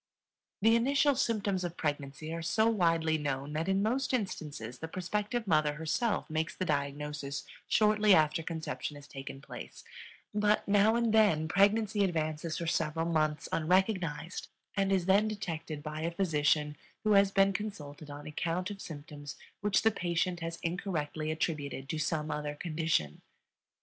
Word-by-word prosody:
The 225 Hz, +1 st, +6 dB
initial 275 Hz, +4 st, +3 dB
symptoms 205 Hz, -7 st, 0 dB
of 175 Hz, -1 st, -4 dB
pregnancy 145 Hz, +1 st, -3 dB
are 165 Hz, -, -3 dB
so 220 Hz, +7 st, +2 dB
widely 165 Hz, -7 st, +2 dB
known 140 Hz, 0 st, -3 dB
that 160 Hz, +4 st, -1 dB
in 195 Hz, +1 st, +2 dB
most 255 Hz, +4 st, +1 dB
instances 145 Hz, -, -4 dB
the 160 Hz, -, -5 dB
prospective 210 Hz, +7 st, -2 dB
mother 155 Hz, -5 st, +3 dB
herself 165 Hz, +9 st, -1 dB
makes 160 Hz, 0 st, -2 dB
the 185 Hz, -, -2 dB
diagnosis 145 Hz, -1 st, -2 dB, 0.2 s
shortly 210 Hz, -2 st, +5 dB
after 155 Hz, +1 st, +3 dB
conception 160 Hz, -2 st, -4 dB
has 145 Hz, 0 st, -12 dB
taken 135 Hz, 0 st, -8 dB
place; -, -, -9 dB, 0.5 s
but 210 Hz, 0 st, +2 dB
now 205 Hz, +2 st, +4 dB
and 235 Hz, -2 st, +2 dB
then 200 Hz, -8 st, +4 dB
pregnancy 205 Hz, +4 st, +3 dB
advances 155 Hz, -3 st, -1 dB
for 170 Hz, -, -3 dB
several 160 Hz, 0 st, 0 dB
months 155 Hz, -2 st, 0 dB
unrecognized 180 Hz, -1 st, 0 dB, 0.3 s
and 195 Hz, -1 st, +1 dB
is 190 Hz, -3 st, +2 dB
then 200 Hz, +3 st, +4 dB
detected 165 Hz, -7 st, -4 dB
by 155 Hz, 0 st, -5 dB
a 165 Hz, -, 0 dB
physician 150 Hz, -4 st, +1 dB, 0.3 s
who 215 Hz, -, +2 dB
has 200 Hz, -1 st, +6 dB
been 195 Hz, 0 st, +3 dB
consulted 155 Hz, -8 st, -6 dB
on 145 Hz, 0 st, -8 dB
account 175 Hz, +5 st, -2 dB
of 200 Hz, -1 st, -8 dB
symptoms 145 Hz, -2 st, -8 dB, 0.2 s
which 205 Hz, -1 st, +2 dB
the 220 Hz, -, +5 dB
patient 175 Hz, -2 st, -1 dB
has 165 Hz, 0 st, -4 dB
incorrectly 165 Hz, -3 st, -2 dB
attributed 150 Hz, -4 st, -2 dB
to 160 Hz, -, -2 dB
some 155 Hz, 0 st, -1 dB
other 150 Hz, 0 st, -3 dB
condition. 155 Hz, -, -1 dB
165 Hz, 155 wpm, -31 LUFS, 150-200 Hz, 0.5 s, The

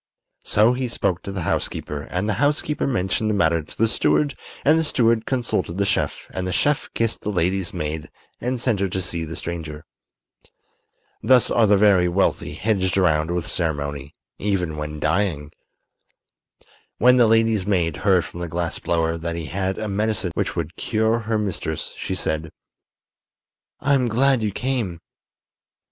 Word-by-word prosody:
So 110 Hz, +4 st, +3 dB
he 130 Hz, 0 st, -2 dB
spoke 95 Hz, -6 st, -1 dB
to 100 Hz, -, -6 dB
the 95 Hz, -3 st, -4 dB
housekeeper 75 Hz, -2 st, -2 dB
and 95 Hz, +4 st, -1 dB
the 105 Hz, -, +1 dB
housekeeper 145 Hz, 0 st, +1 dB
mentioned 110 Hz, -2 st, 0 dB
the 105 Hz, -, +1 dB
matter 85 Hz, -4 st, +2 dB
to 75 Hz, -, -14 dB
the 115 Hz, -, +3 dB
steward 140 Hz, +5 st, +1 dB, 0.3 s
and 155 Hz, +3 st, +5 dB
the -, -, +1 dB
steward 115 Hz, -6 st, +2 dB
consulted 105 Hz, -, -1 dB
the 100 Hz, -, +1 dB
chef 80 Hz, -8 st, -1 dB
and 90 Hz, 0 st, -3 dB
the -, -, -2 dB
chef 145 Hz, +10 st, +1 dB
kissed 115 Hz, -1 st, -1 dB
the -, -, -3 dB
lady's 95 Hz, -1 st, 0 dB
maid 75 Hz, +1 st, -4 dB, 0.3 s
and 125 Hz, +1 st, -2 dB
sent 115 Hz, -4 st, +1 dB
her 100 Hz, -1 st, 0 dB
to 95 Hz, -, -2 dB
see 85 Hz, -2 st, -4 dB
the 80 Hz, +1 st, -7 dB
stranger. 80 Hz, -3 st, -6 dB, 1.4 s
Thus 125 Hz, -2 st, +4 dB
are 115 Hz, -2 st, +4 dB
the 100 Hz, 0 st, +5 dB
very 95 Hz, -3 st, +5 dB
wealthy 90 Hz, +3 st, 0 dB
hedged 95 Hz, -3 st, 0 dB
around 80 Hz, -4 st, +2 dB
with 85 Hz, -1 st, -1 dB
ceremony, 75 Hz, -4 st, -3 dB, 0.2 s
even 90 Hz, -6 st, -1 dB
when 75 Hz, 0 st, -5 dB
dying. 80 Hz, -3 st, 0 dB, 1.5 s
When 125 Hz, +2 st, +5 dB
the 120 Hz, -2 st, +6 dB
lady's 110 Hz, -3 st, +3 dB
maid 85 Hz, -6 st, +1 dB
heard 95 Hz, -2 st, +3 dB
from 85 Hz, -, -9 dB
the 85 Hz, -, -3 dB
glass 85 Hz, +1 st, -2 dB
blower 80 Hz, -1 st, 0 dB
that 85 Hz, +1 st, -3 dB
he 85 Hz, -1 st, -4 dB
had 95 Hz, +5 st, -2 dB
a 110 Hz, -, -3 dB
medicine 105 Hz, -2 st, 0 dB
which -, -, -2 dB
would -, -, -3 dB
cure 110 Hz, +1 st, +1 dB
her 110 Hz, 0 st, -1 dB
mistress, 100 Hz, -5 st, -3 dB
she 95 Hz, -, -4 dB
said: 80 Hz, -3 st, -2 dB, 1.3 s
"I'm 135 Hz, -2 st, +2 dB
glad 130 Hz, +2 st, +3 dB
you 105 Hz, -1 st, 0 dB
came." 115 Hz, -8 st, -2 dB
95 Hz, 165 wpm, -22 LUFS, 85-115 Hz, 1.5 s, the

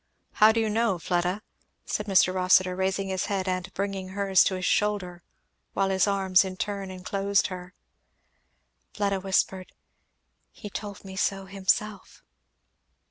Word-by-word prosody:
"How 215 Hz, +1 st, +6 dB
do 230 Hz, -, 0 dB
you 225 Hz, -, +1 dB
know, 220 Hz, -2 st, +1 dB
Fleda?" 180 Hz, +4 st, -1 dB, 0.4 s
said 210 Hz, -, -3 dB
Mr. 185 Hz, -2 st, +4 dB
Rossitur 185 Hz, 0 st, +3 dB
raising 190 Hz, +1 st, -1 dB
his 190 Hz, -1 st, -1 dB
head 195 Hz, -2 st, -2 dB
and 185 Hz, 0 st, -2 dB
bringing 195 Hz, -1 st, -3 dB
hers 195 Hz, -1 st, +3 dB
to 190 Hz, -, 0 dB
his 185 Hz, -1 st, -3 dB
shoulder, 190 Hz, -5 st, 0 dB, 0.5 s
while 195 Hz, 0 st, +1 dB
his 190 Hz, +2 st, +2 dB
arms 190 Hz, -2 st, +3 dB
in 185 Hz, -1 st, -6 dB
turn 200 Hz, -1 st, -4 dB
enclosed 195 Hz, +2 st, 0 dB
her. 180 Hz, 0 st, -9 dB, 1.2 s
Fleda 200 Hz, -2 st, 0 dB
whispered, 190 Hz, -1 st, -1 dB, 0.8 s
"He 210 Hz, -, -10 dB
told 205 Hz, -1 st, -7 dB
me 190 Hz, 0 st, -8 dB
so 195 Hz, 0 st, -1 dB
himself." 195 Hz, +1 st, -2 dB
195 Hz, 140 wpm, -26 LUFS, 185-200 Hz, 1.2 s, How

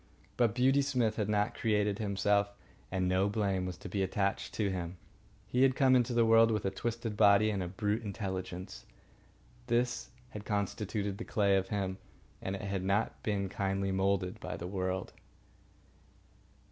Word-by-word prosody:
But 115 Hz, -3 st, +2 dB
Beauty 135 Hz, +3 st, +4 dB
Smith 125 Hz, -6 st, 0 dB
had 105 Hz, -2 st, -1 dB
not 105 Hz, -1 st, +1 dB
created 105 Hz, -2 st, 0 dB
himself, 100 Hz, 0 st, +1 dB, 0.4 s
and 95 Hz, -1 st, 0 dB
no 95 Hz, +2 st, +2 dB
blame 100 Hz, -3 st, 0 dB
was 90 Hz, -3 st, -5 dB
to -, -, -9 dB
be 100 Hz, +1 st, -2 dB
attached 95 Hz, +1 st, -1 dB
to 100 Hz, -3 st, 0 dB
him. 90 Hz, -1 st, -4 dB, 0.5 s
He 125 Hz, +5 st, 0 dB
had 135 Hz, -1 st, +5 dB
come 130 Hz, -2 st, +5 dB
into 125 Hz, 0 st, +2 dB
the 115 Hz, -1 st, +4 dB
world 115 Hz, 0 st, +6 dB
with 105 Hz, -3 st, -1 dB
a 95 Hz, -, +1 dB
twisted 115 Hz, 0 st, -3 dB
body 105 Hz, +1 st, +5 dB
and 100 Hz, -2 st, -2 dB
a 90 Hz, -, -2 dB
brute 105 Hz, +4 st, -1 dB
intelligence. 95 Hz, -3 st, -5 dB, 0.8 s
This 120 Hz, 0 st, 0 dB, 0.2 s
had 105 Hz, -, -8 dB
constituted 100 Hz, -1 st, -2 dB
the -, -, -3 dB
clay 100 Hz, -4 st, +2 dB
of 95 Hz, 0 st, +1 dB
him, 95 Hz, -2 st, -2 dB, 0.4 s
and 95 Hz, -, -3 dB
it 95 Hz, -, -7 dB
had 100 Hz, -1 st, -2 dB
not 100 Hz, +3 st, 0 dB
been 100 Hz, -2 st, -1 dB
kindly 95 Hz, +1 st, -1 dB
moulded 95 Hz, -1 st, 0 dB
by -, -, -5 dB
the 85 Hz, -, -6 dB
world. 95 Hz, 0 st, -3 dB
100 Hz, 170 wpm, -32 LUFS, 95-110 Hz, 0.8 s, world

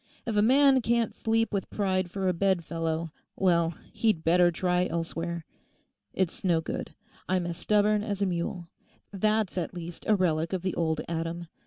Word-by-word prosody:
If 225 Hz, -, -2 dB
a 205 Hz, -, +4 dB
man 265 Hz, +3 st, +5 dB
can't 235 Hz, 0 st, +1 dB
sleep 225 Hz, 0 st, 0 dB
with 200 Hz, -, -2 dB
pride 185 Hz, -3 st, 0 dB
for 190 Hz, +1 st, -2 dB
a 185 Hz, -, +2 dB
bed 185 Hz, -1 st, +1 dB
fellow, 165 Hz, 0 st, -2 dB, 0.2 s
well, 170 Hz, -3 st, +2 dB, 0.2 s
he'd 215 Hz, -8 st, +1 dB
better 175 Hz, +1 st, +5 dB
try 180 Hz, +1 st, +1 dB
elsewhere. 170 Hz, 0 st, -3 dB, 0.7 s
It's 190 Hz, -3 st, -2 dB
no 175 Hz, -3 st, +3 dB
good; 160 Hz, -, -5 dB, 0.3 s
I'm 185 Hz, -1 st, +1 dB
as 170 Hz, -1 st, -4 dB
stubborn 210 Hz, 0 st, +3 dB
as 205 Hz, -2 st, -3 dB
a 200 Hz, -, +2 dB
mule; 175 Hz, -1 st, -3 dB, 0.5 s
that's 215 Hz, -1 st, +1 dB
at 175 Hz, +1 st, -4 dB
least 170 Hz, -1 st, -7 dB
a 215 Hz, -, +5 dB
relic 165 Hz, -2 st, 0 dB
of 185 Hz, -2 st, -2 dB
the 185 Hz, -, -1 dB
old 160 Hz, -2 st, 0 dB
Adam. 165 Hz, 0 st, -4 dB
180 Hz, 175 wpm, -28 LUFS, 170-205 Hz, 0.7 s, man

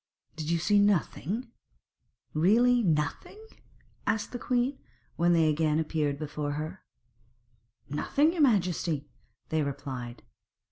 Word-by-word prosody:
'Did 155 Hz, -1 st, -4 dB
you 170 Hz, -, +2 dB
see 205 Hz, +5 st, +3 dB
nothing, 205 Hz, -, 0 dB, 0.8 s
really 235 Hz, +10 st, +4 dB
nothing?' 155 Hz, -, -1 dB, 0.7 s
asked 220 Hz, -, 0 dB
the 245 Hz, -, -5 dB
queen, 250 Hz, +3 st, 0 dB, 0.4 s
when 175 Hz, +1 st, +3 dB
they 165 Hz, -2 st, +4 dB
again 155 Hz, 0 st, +2 dB
appeared 155 Hz, -3 st, 0 dB
before 150 Hz, -1 st, -3 dB
her. 155 Hz, +5 st, -5 dB, 1.0 s
'Nothing, 280 Hz, -, +1 dB
your 345 Hz, -, -1 dB
majesty,' 175 Hz, -, +1 dB, 0.4 s
they 160 Hz, 0 st, +1 dB
replied. 135 Hz, -4 st, -5 dB
165 Hz, 110 wpm, -29 LUFS, 150-215 Hz, 1.0 s, really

